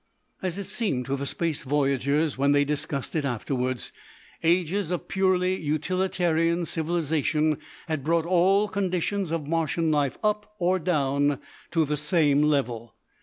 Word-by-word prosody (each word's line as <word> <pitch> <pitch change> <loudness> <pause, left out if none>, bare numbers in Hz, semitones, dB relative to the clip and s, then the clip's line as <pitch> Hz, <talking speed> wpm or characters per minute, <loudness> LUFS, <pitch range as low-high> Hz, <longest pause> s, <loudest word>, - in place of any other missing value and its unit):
As 185 -1 -2
it 200 - -3
seemed 200 - -1
to 135 - -1
the 140 0 -3
space 165 -1 -1
voyagers, 140 +2 +1
when 140 +2 +3
they 145 0 +3
discussed 145 -1 -3
it 155 - +1
afterwards, 130 -1 -2 0.5
ages 175 +2 +1
of 180 -1 -3
purely 185 -1 +2
utilitarian 170 +1 0
civilisation 155 -2 0 0.3
had 155 -4 -2
brought 165 +2 +1
all 185 +4 +3
conditions 190 -2 -1
of 165 -3 -2
Martian 165 0 0
life 145 -3 +1
up 210 0 -1
or 185 0 +2
down 145 -4 +1 0.3
to 165 -2 +2
the 150 +1 -1
same 150 -1 +3
level. 120 -6 0
160 Hz, 140 wpm, -26 LUFS, 145-180 Hz, 0.5 s, when